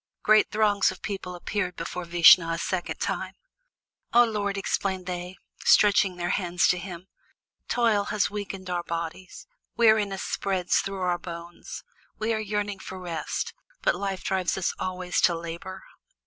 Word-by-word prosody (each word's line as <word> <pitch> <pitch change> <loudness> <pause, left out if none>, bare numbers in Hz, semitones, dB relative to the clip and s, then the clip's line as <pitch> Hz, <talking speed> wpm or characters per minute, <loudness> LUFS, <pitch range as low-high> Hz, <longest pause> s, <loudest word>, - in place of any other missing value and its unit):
Great 215 0 +5
throngs 210 -2 +3
of - - -8
people 190 -3 -4
appeared 180 0 -3
before 175 +1 -5
Vishnu 170 0 +7
a 165 - -1
second 180 +1 -2
time. - - -3 0.8
"O 240 - +8
Lord!" 205 -3 -2
exclaimed 190 -1 -1
they, 180 0 -5 0.3
stretching 200 -2 +5
their 175 0 -2
hands 180 -3 +1
to 180 - +2
him, 180 -1 -8 0.6
"toil 225 -4 +2
has 210 0 +1
weakened 200 -2 -6
our 175 -1 -1
bodies, 170 +2 -6 0.3
weariness 215 -4 +3
spreads 185 -2 0
through 195 -1 -4
our 180 -1 0
bones, 170 0 -8 0.3
we 220 +1 0
are 220 - -1
yearning 205 -1 -2
for 185 0 -8
rest, 170 -4 -3 0.3
but - - +4
Life 195 -2 -3
drives 190 -2 0
us 190 - 0
always 180 -1 -1
to 170 - +4
labor." 170 +3 -7
185 Hz, 150 wpm, -26 LUFS, 175-205 Hz, 0.8 s, O